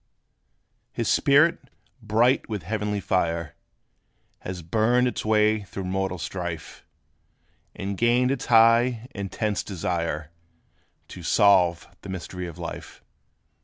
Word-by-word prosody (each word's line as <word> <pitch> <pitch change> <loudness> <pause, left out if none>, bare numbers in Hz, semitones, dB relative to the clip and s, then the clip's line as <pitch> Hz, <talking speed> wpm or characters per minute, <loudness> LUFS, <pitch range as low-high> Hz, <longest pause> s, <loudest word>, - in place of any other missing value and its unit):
His - - -3
spirit, 145 +4 +3 0.3
bright 115 +5 +2
with 105 -5 -4
heavenly 105 +2 -2
fire, 85 -5 -1 0.9
Has 90 -2 -7
burned 115 +8 +2
its 125 - -3
way 110 0 +2
through 100 0 -7
mortal 95 0 -2
strife; 85 0 -6 0.9
And 100 +1 -4
gained 120 +2 +3
its 135 - -3
high, 115 +1 +4
intense 100 +1 -2
desire 85 -4 -3 0.8
To 90 - -9
solve 90 -2 +3
the 100 - -10
mystery 90 -1 -6
of 85 - -9
life. - - -8
100 Hz, 110 wpm, -25 LUFS, 90-115 Hz, 0.9 s, high